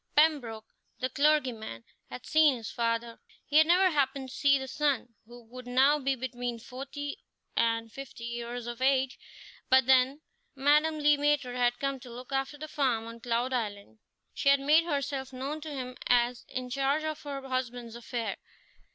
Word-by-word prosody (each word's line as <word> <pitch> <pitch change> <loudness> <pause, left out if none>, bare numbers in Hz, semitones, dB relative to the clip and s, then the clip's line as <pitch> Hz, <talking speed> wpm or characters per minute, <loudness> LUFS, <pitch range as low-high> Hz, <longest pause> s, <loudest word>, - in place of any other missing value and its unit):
Pembroke, 270 -8 +2 0.3
the 255 0 -2
clergyman, 255 - +1 0.3
had 125 - -8
seen 305 -4 +4
his 225 -1 -7
father. 230 0 -2 0.3
He 295 - +2
had 315 0 +7
never 365 +2 +5
happened 270 -3 0
to - - -9
see 280 -1 +4
the 265 0 -5
son, 270 -4 -1
who 240 0 -13
would 250 +2 -11
now 270 +4 +4
be 275 -1 0
between 245 -1 -4
forty 275 - -7 0.4
and 230 -1 +1
fifty 270 -2 -9
years 235 0 -5
of 240 +1 -6
age; 265 -1 +2 0.5
but 260 -2 +6
when 265 +3 +4 0.3
Madame 300 +3 +3
Le 295 -1 +4
Maître 285 -4 +1
had 245 -1 +2
come 275 -1 -2
to 245 - -12
look 245 +3 -10
after 270 +2 -1
the 310 +2 -7
farm 255 -7 0
on 230 0 -9
Cloud 245 +2 -1
Island, 210 -3 -4 0.3
she 280 - +2
had 280 0 +6
made 305 +4 +4
herself 280 -4 -2
known 275 +4 -4
to 310 - -7
him 255 -3 -5
as 245 0 +2
in 255 -1 -5
charge 275 +3 +1
of 310 0 -3
her 275 -2 -6
husband's 245 -3 -3
affairs. 235 -1 -4
260 Hz, 175 wpm, -29 LUFS, 240-285 Hz, 0.5 s, had